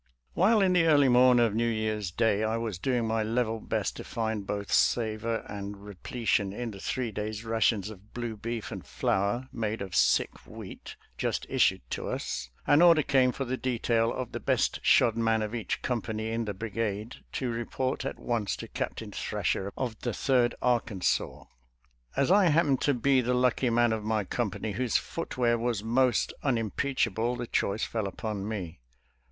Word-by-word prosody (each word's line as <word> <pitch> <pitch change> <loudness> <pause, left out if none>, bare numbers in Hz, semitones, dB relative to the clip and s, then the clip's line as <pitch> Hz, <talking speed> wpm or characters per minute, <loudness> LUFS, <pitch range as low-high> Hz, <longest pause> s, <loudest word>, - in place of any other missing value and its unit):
While 210 +4 +4
in 185 -1 +3
the 170 -2 +4
early 145 -4 +5
morn 125 0 +6
of 115 -3 +3
New 115 +2 +1
Year's 110 -3 -1
Day 110 +3 +1
I 110 +1 0
was 110 -6 -3
doing 125 +2 0
my 110 0 0
level 115 0 0
best - - -2
to - - -6
find 110 -3 -3
both 100 -1 -3
savor 115 0 +1
and 100 0 -6
repletion 105 0 -1
in 115 +3 -4
the 100 - -10
three 120 +3 -2
days' 105 +1 -4
rations 110 -2 +1
of 105 0 -14
blue 120 -2 -4
beef 115 +1 -5
and - - -6
flour 100 +7 -1
made 110 -2 -2
of 95 -2 -5
sick - - +2
wheat - - -9 0.2
just - - -1
issued - - +2
to - - -3
us, 65 -1 -3 0.2
an 145 +2 +5
order 170 -3 +7
came 130 -2 +3
for 135 - -4
the 130 +1 -2
detail 115 -2 +1
of 130 -1 -4
the - - -4
best - - +1
shod 115 - +4
man 115 -1 +1
of 105 +1 -4
each 115 -6 -3
company 110 -2 -2
in 115 0 -1
the 105 -2 -4
brigade 110 +1 -3 0.2
to 125 -3 -2
report 130 +4 -2
at 135 - -4
once 115 -4 -1
to - - -8
Captain - - -5
Thrasher 100 +1 -2
of 120 -4 -3
the 120 - -3
Third 125 -1 +2
Arkan 115 -6 0
sas. - - 0 0.7
As 140 +4 +3
I 200 0 +6
happened 150 -5 +3
to 145 - +2
be 130 +2 +3
the 125 +1 0
lucky 125 0 +2
man 120 0 +3
of 110 -1 -3
my 110 -1 0
company 110 0 -2
whose 120 +3 +1
footwear 120 -8 -1
was 115 -3 -1
most 120 +2 +2
unimpeach 130 +1 0
able, 115 +3 -1
the 120 0 -4
choice 105 -1 0
fell 110 -3 -2
upon 100 0 -4
me. 90 -8 -5
115 Hz, 185 wpm, -28 LUFS, 105-125 Hz, 0.7 s, order